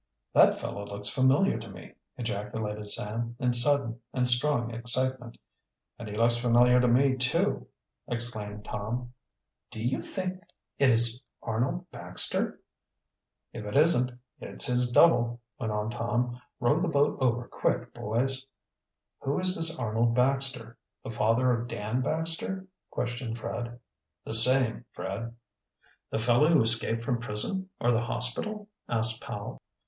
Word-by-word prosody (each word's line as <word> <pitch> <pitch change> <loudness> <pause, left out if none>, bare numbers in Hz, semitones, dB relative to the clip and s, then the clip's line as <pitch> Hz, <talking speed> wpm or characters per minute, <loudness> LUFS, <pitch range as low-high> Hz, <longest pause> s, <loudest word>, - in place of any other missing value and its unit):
"That - - +5
fellow 100 - -5
looks 100 0 -5
familiar 130 +3 +2
to 115 - -10
me," 90 -4 -12 0.2
ejaculated 105 -2 -4
Sam, 115 +3 -2
in 125 -2 0
sudden 120 -1 +1
and 125 -1 0
strong 120 -1 +1
excitement. 120 +1 0 0.6
"And 115 -3 -7
he 105 - -6
looks 120 +1 +3
familiar 120 +1 +4
to 125 - +3
me, 130 +2 +3
too," 130 0 0 0.4
exclaimed 110 -3 -3
Tom. 120 +4 -5 0.6
"Do 110 - -6
you 130 +2 0
think 185 -1 -4 0.4
it 140 - +5
is 120 +1 +4 0.2
Arnold 125 +10 -2
Baxter?" - - -2 0.9
"If 110 - -7
it 105 +5 -2
isn't, 145 -5 +4 0.3
it's - - -1
his 125 -1 +2
double," 120 -5 +4 0.2
went 110 -4 -2
on 105 +1 -2
Tom. 120 +1 -2 0.2
"Row 125 +5 +2
the 180 - 0
boat 145 -3 +1
over 120 -1 +1
quick, - - -2
boys." 130 +5 -2 0.8
"Who 140 +1 -2
is 185 0 +5
this 165 0 +2
Arnold 115 +1 0
Baxter? 125 -2 0 0.2
The - - -6
father 115 +4 +2
of 120 0 -1
Dan 110 +2 -3
Baxter?" 165 +6 -1 0.2
questioned 120 -1 -4
Fred. 120 +1 -5 0.5
"The - - -5
same, 120 0 +5
Fred." 115 +5 -5 0.7
"The - - -2
fellow 120 +6 +3
who 160 -6 +4
escaped 115 0 +2
from 120 0 -1
prison, 185 - +1
or 120 - +2
the 115 -1 +2
hospital?" 205 - -1 0.2
asked 115 -1 +3
Powell. - - -7
120 Hz, 140 wpm, -28 LUFS, 115-130 Hz, 0.9 s, That